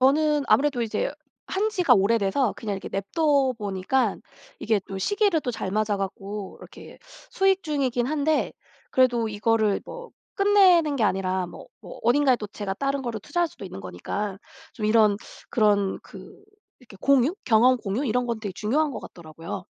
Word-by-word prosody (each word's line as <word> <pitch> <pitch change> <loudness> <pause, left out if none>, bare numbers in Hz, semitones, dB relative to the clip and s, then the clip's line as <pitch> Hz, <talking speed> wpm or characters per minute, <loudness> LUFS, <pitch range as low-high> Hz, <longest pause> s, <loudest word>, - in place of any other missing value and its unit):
저는 295 +3 +3
아무래도 275 -3 +3
이제 220 +3 -2 0.3
한 405 +3 0
지가 360 - +3
오래돼서 210 +3 +2
그냥 210 -3 -4
이렇게 195 - -7
내버려 195 - -3
둬 285 -5 +3
보니까 205 +3 0 0.4
이게 220 -2 +1
또 195 -1 -5
시기를 400 - +1
또 255 - -3
잘 200 -5 -4
맞아 210 +1 0
갖고 195 +1 -5
이렇게 - - -13 0.3
수익 385 0 +2
중이긴 260 -6 -1
한데 305 +1 0 0.4
그래도 245 -3 +2
이거를 215 0 +1
뭐 485 -1 -9 0.3
끝내는 370 -7 +5
게 240 - -1
아니라 190 -2 0
뭐, 175 - -11
뭐 - - -11
어딘가에 260 +2 +4
또 215 - -6
제가 205 -1 -5
다른 275 +4 -2
거를 235 -4 -4
투자할 340 - -1
수도 205 - -12
있는 180 - -8
거니까 185 - -5 0.3
좀 215 - -3
이런 215 -2 +4 0.3
그런 205 -3 +2
그 - - -13 0.4
이렇게 240 -6 -16
공유? 280 +3 +3
경험 245 +2 +5
공유? 220 +3 -3
이런 245 +2 +1
건 230 -2 -3
되게 205 -3 -5
중요한 285 +10 0
것 - - -6
같더라고요. 165 +2 -8
235 Hz, 350 characters per minute, -25 LUFS, 200-285 Hz, 0.4 s, 끝내는